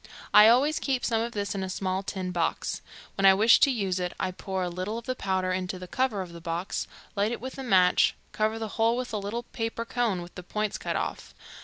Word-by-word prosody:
I 210 - +9
always 275 +7 +4
keep 260 -3 -1
some 225 -1 +1
of 235 +1 -3
this 200 -1 -2
in 195 - -3
a 190 - -3
small 185 0 -1
tin 190 -2 -4
box. 170 -2 -1 0.3
When 195 - 0
I 190 - +8
wish 220 +3 +6
to - - +5
use 195 -7 -1
it 180 -1 -2
I 185 - -1
pour 190 0 -4
a - - -1
little 185 +5 -4
of 235 - -7
the 255 - -1
powder 190 -5 -1
into 185 0 -2
the 180 0 -8
cover 235 -3 0
of 175 -2 -11
the 170 - -10
box, 170 +3 -3 0.3
light 205 +2 +1
it 240 - -3
with 260 +2 -7
a - - -4
match, 185 -7 +4 0.2
cover 220 +1 0
the 220 -1 -4
whole 230 +2 +3
with 250 -2 -4
a 210 - 0
little 210 +4 -4
paper 230 0 -4
cone 230 -7 -1
with 175 - -12
the - - -8
point 210 +3 -3
cut - - -3
off. - - -4
200 Hz, 250 wpm, -27 LUFS, 185-230 Hz, 0.3 s, I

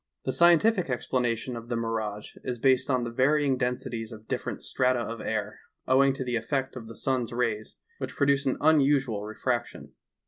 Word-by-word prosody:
The 130 - +1
scientific 175 - +4
explanation, 125 -1 -1
of 115 0 -8
the 120 - -1
mirage 110 -2 -3
is 125 -1 -3
based 130 +2 +3
on 130 -2 +2
the 120 - -4
var^dng 140 +2 +2
densities 125 -2 -3
of 110 -1 -11
different - - -3
strata 130 -1 +1
of 115 0 -4
air, - - -3 0.3
owing 135 +1 +5
to 135 - -4
the 125 -2 -2
effect 130 +4 -2
of 115 -3 -8
the 115 - -10
sun's 130 -3 -1
rays, 115 -3 -2 0.2
which - - -5
produces 140 -1 +2
an 130 - +1
unusual 140 -8 +3
refraction. 120 +3 -3
125 Hz, 175 wpm, -27 LUFS, 115-135 Hz, 0.3 s, owing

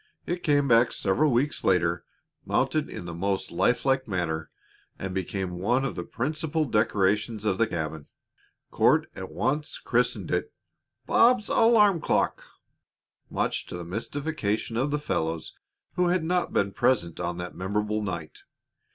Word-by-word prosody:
It 175 +1 -3
came 145 -2 +2
back 115 -1 +5
several 125 +11 +1
weeks 130 +5 0
later, 90 -2 +2 0.4
mounted - - 0
in - - -7
the 85 - -6
most 95 +3 -2
lifelike 130 +7 +1
manner, 85 -5 -2 0.5
and 95 -1 -5
became 95 -1 -3
one 125 +8 +1
of 130 - -2
the - - -3
principal 155 - -2
decorations 105 -1 +1
of 100 -1 +1
the 115 - +3
cabin. 80 -5 -4 0.6
Court - - +4
at 95 0 -6
once 145 +5 -1
christened - - 0
it 445 - -1 0.5
"Bob's 235 -2 +4
alarm 210 -6 +5
clock," - - 0 0.9
much - - -1
to - - -6
the 90 - -7
mystification 115 - -3
of 130 +5 +1
the 150 - 0
fellows 80 - -2 0.4
who 180 -1 +2
had 175 -1 +1
not 180 +2 0
been 100 0 +1
present 120 -9 +1
on 85 0 -2
that 90 0 -5
memorable 105 +3 -1
night. 85 -6 -5
110 Hz, 145 wpm, -27 LUFS, 90-145 Hz, 0.9 s, back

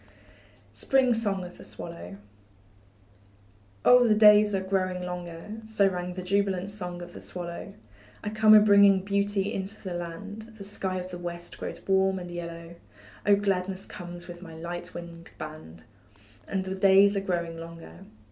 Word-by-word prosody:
SPRING 265 -2 +3
SONG 205 -5 0
OF 180 0 -10
THE - - -10
SWALLOW. 90 +3 -9 1.7
Oh, 245 -1 +7
the 215 - +5
days 210 -1 +7
are - - +1
growing 185 -1 -1
longer; 180 +3 -6
So 220 -2 +2
rang 180 -1 -3
the 185 - -5
jubilant 195 0 0
song 180 -3 -6
of 175 0 -11
the - - -10
swallow; 170 -1 -7 0.5
I 210 - -3
come 215 0 +6
a - - +11
bringing 200 -2 +6
beauty 200 0 0
into 195 +3 -5
the 185 -3 -6
land, 205 +6 -7
The 205 - -9
sky 195 -2 -3
of 185 0 -6
the 175 - -6
West 175 0 -7
grows - - -7
warm 190 0 +3
and 175 -1 -7
yellow, 170 0 -7 0.5
Oh, 205 - +7
gladness 195 -1 -1
comes 175 -1 -9
with 175 -1 -9
my 165 -3 -10
light 175 +2 -7
winged 170 -1 -9
band, 155 - -9 0.6
And 190 -1 -2
the 190 - -3
days 195 +1 +5
are 195 - +1
growing 170 -3 -2
longer. 165 - -10
185 Hz, 165 wpm, -27 LUFS, 175-200 Hz, 1.7 s, a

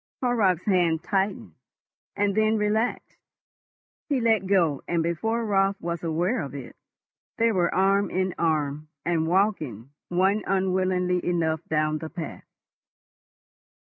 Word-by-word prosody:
Horrocks' 205 -8 +2
hand 175 -5 +2
tightened 195 +1 -1 0.6
and 205 0 +1
then 215 +1 +2
relaxed. 215 +3 -1 0.9
He 280 -3 +1
let 220 -5 +2
go, 170 -8 +2
and 170 -1 0
before 225 +8 -1
Raut 195 -1 +2
was 170 -1 -4
aware 175 +8 0
of 140 -2 -6
it, 135 -3 -8 0.6
they 230 0 +3
were 180 -4 +1
arm 195 +1 +2
in 185 0 -1
arm, 150 -2 0 0.2
and 165 -2 +1
walking, 160 - 0 0.2
one 190 +4 +2
unwillingly 185 -1 +1
enough, 160 -3 0
down 155 0 0
the 160 - -6
path. 165 -3 -7
185 Hz, 125 wpm, -25 LUFS, 160-200 Hz, 0.9 s, they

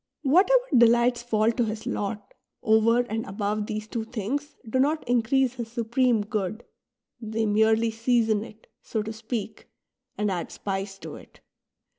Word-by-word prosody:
Whatever 385 - +4
delights 240 +1 +4
fall 225 -2 +2
to 240 +1 0
his 215 0 -5
lot 205 0 -4 0.3
over 220 +2 +4
and 225 -2 -3
above 205 +1 -2
these 215 0 -4
two 230 0 -3
things 245 +7 -4
do 260 +4 0
not 300 +3 +1
increase 245 +2 +2
his 235 -3 -6
Supreme 235 0 +1
Good; 215 0 -3 0.6
they 220 0 -2
merely 220 +2 +3
season 225 -2 +1
it, 220 -1 -14 0.2
so 220 -2 -3
to 220 +1 -5
speak, 220 -1 -6 0.5
and 210 -1 0
add 175 -2 -3
spice 195 0 -4
to - - -9
it. - - -17
225 Hz, 150 wpm, -26 LUFS, 215-240 Hz, 0.6 s, Whatever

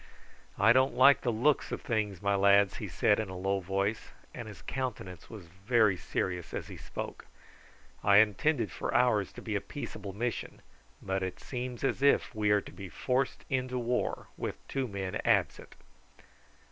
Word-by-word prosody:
"I 110 +3 +6
don't 130 +2 +3
like 135 +2 +6
the 120 - 0
look 130 +7 +1
of - - -4
things, 110 -8 -2
my 100 0 +2
lads," 100 0 +4
he - - -5
said 105 - +2
in 110 -3 -3
a 95 - -6
low 95 +1 0
voice, 100 +4 -2 0.2
and 120 -3 -7
his 95 -3 -11
countenance 110 -9 -5
was 105 -6 -9
very 100 +4 +2
serious 90 +1 -3
as - - -5
he - - -8
spoke. - - -7 0.8
"I 100 0 +6
intended 110 - +3
for - - -3
ours 120 -5 +3
to - - -10
be - - -3
a - - 0
peaceable 95 - -7
mission, 115 +2 -4 0.4
but 95 0 -1
it 95 -1 -4
seems 125 -2 -5
as 135 - 0
if 140 -2 +3
we 105 -2 0
are 105 0 +4
to - - -12
be 100 -2 -9
forced 130 +7 -1
into 130 -1 -1
war 125 0 -1
with - - -5
two 135 -1 -2
men 95 -3 -4
absent." - - +1
105 Hz, 175 wpm, -30 LUFS, 95-125 Hz, 0.8 s, I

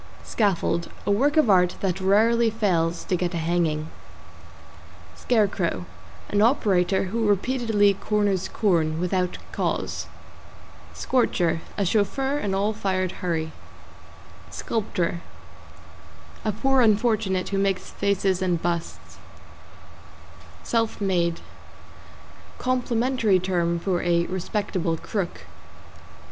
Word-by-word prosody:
=SCAFFOLD= 180 -5 0 0.2
A - - +1
work 280 +9 +2
of 310 - +5
art 180 -3 +4
that 190 -1 -1
rarely 225 +4 +3
fails 175 -7 0
to 185 - -1
get 180 0 -2
a - - 0
hanging. 160 -2 -1 1.2
=SCARECROW= 190 - 0 0.4
An 205 - +1
operator 195 -6 +2
who 220 +4 -1
repeatedly 210 -1 +2
corners 200 -2 0
corn, 165 -6 +1
without 180 0 -1
caws. - - -2 0.9
=SCORCHER= 175 -10 +1 0.2
A 200 - +1
chauffeur 265 +9 0
in - - -4
an 195 - -1
all 205 +3 +1
fired 185 -3 -1
hurry. 160 -3 -2 1.0
=SCULPTOR= 180 -6 -2 1.2
A 215 - 0
poor 265 +5 +2
unfortunate 215 -4 +2
who 195 - -1
makes 195 -1 -1
faces 195 -2 0
and 180 -3 +1
busts. 170 0 -4 1.4
=SELF 225 -1 -1
MADE= 175 -4 0 1.2
Complimentary 245 -4 +1
term 175 -2 0
for 175 0 -1
a 170 -1 +2
respectable 185 -2 -2
crook. 195 0 -4
195 Hz, 105 wpm, -24 LUFS, 175-220 Hz, 1.4 s, of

